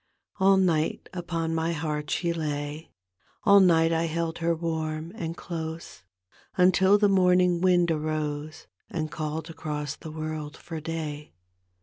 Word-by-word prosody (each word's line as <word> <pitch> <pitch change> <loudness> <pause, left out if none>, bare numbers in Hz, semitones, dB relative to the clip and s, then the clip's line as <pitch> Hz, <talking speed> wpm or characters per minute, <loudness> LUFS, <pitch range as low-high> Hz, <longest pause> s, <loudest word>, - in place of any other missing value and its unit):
All 195 0 +5
night 165 -5 +1
upon 170 -2 -2
my 165 +1 0
heart 150 -1 -3
she 170 -1 0
lay, 150 -1 -4 0.5
All 200 0 +7
night 165 -3 +4
I 165 0 +1
held 165 +1 -2
her 170 0 +1
warm 160 -1 -3
and 165 -6 -5
close, 160 -1 -6 0.6
Until 190 +2 +5
the 205 0 +4
morning 180 -2 +4
wind 175 -2 +4
arose 155 0 -3 0.2
And 155 -2 -3
called 155 +1 -4
across 150 -2 -4
the 160 - -9
world 155 -1 -5
for 165 -2 -7
day. 155 - -5
160 Hz, 135 wpm, -27 LUFS, 155-175 Hz, 0.6 s, All